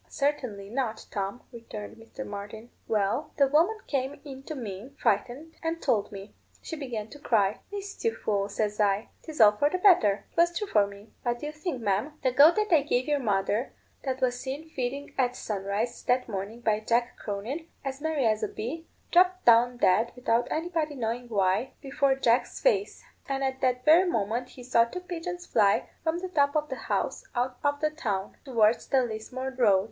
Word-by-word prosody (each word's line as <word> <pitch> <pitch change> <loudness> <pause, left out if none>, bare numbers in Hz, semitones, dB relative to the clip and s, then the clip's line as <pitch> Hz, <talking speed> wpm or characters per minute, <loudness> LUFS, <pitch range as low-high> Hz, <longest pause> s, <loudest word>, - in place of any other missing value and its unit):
"Certainly 250 -9 -2
not, 235 -3 -2
Tom," 200 +4 -3
returned 230 -3 -8
Mr. 230 +4 -9
Martin. 210 +3 -8 0.2
"Well, 210 +6 0
the 280 - +6
woman 320 +11 +3
came 275 0 -2
in 270 -2 -8
to 310 - -5
me, 230 +1 -7
frightened, 250 +10 0
and 330 0 -2
told 210 -9 +1
me. 200 0 -9 0.3
She 325 - -6
began 245 -8 -5
to 290 - -12
cry. 210 -7 +2
'Whist, 400 -1 -7
you 455 -1 +1
fool?' 200 -1 -1
says 210 0 -2
I; 205 0 +2
'tis 315 -2 -9
all 215 -2 +9
for 250 +8 +1
the 365 - -1
better.' 335 - +4
'Twas 345 0 +3
true 420 - -1
for 210 - +3
me. 200 +2 -13
What 240 -1 -1
do 270 - -7
you 300 - -3
think, 305 -5 -4
ma'am; 205 +9 0
the 260 - +3
goat 290 +7 +7
that 425 -4 +1
I 310 - +6
gave 260 -3 0
your 295 -1 +2
mother, 210 +1 0 0.3
that 265 -1 -2
was 245 -1 +1
seen 280 +5 -5
feeding 275 +2 -4
at 250 -1 +2
sunrise 205 +3 -3
that 250 +1 +2
morning 210 +2 -5
by 215 -2 +2
Jack 235 +2 0
Cronin, 225 +11 -5 0.2
as 270 +1 -4
merry 310 -4 0
as 215 -1 +2
a 215 - 0
bee, 295 +12 -6 0.2
dropped 365 +1 +4
down 240 +1 +6
dead 220 +3 +3
without 240 -1 +1
anybody 320 -2 -1
knowing 240 0 -3
why, 200 +4 +1
before 275 -1 +1
Jack's 245 -2 +1
face; 415 -5 +1 0.3
and 275 0 -1
at 265 0 -2
that 250 -1 +1
very 340 +4 +6
moment 230 0 -1
he 250 - -12
saw 240 -2 +4
two 300 +10 -6
pigeons 355 0 -5
fly 205 -3 +2
from 325 +1 0
the 370 +1 -5
top 285 -4 +2
of 300 0 0
the 265 - -3
house - - -1
out 250 +1 -1
of 285 0 +1
the 305 0 +2
town, 205 -11 -3
towards 230 -4 +2
the 265 -2 +3
Lismore 245 +4 -5
road. 210 -7 +5
250 Hz, 195 wpm, -28 LUFS, 215-295 Hz, 0.3 s, all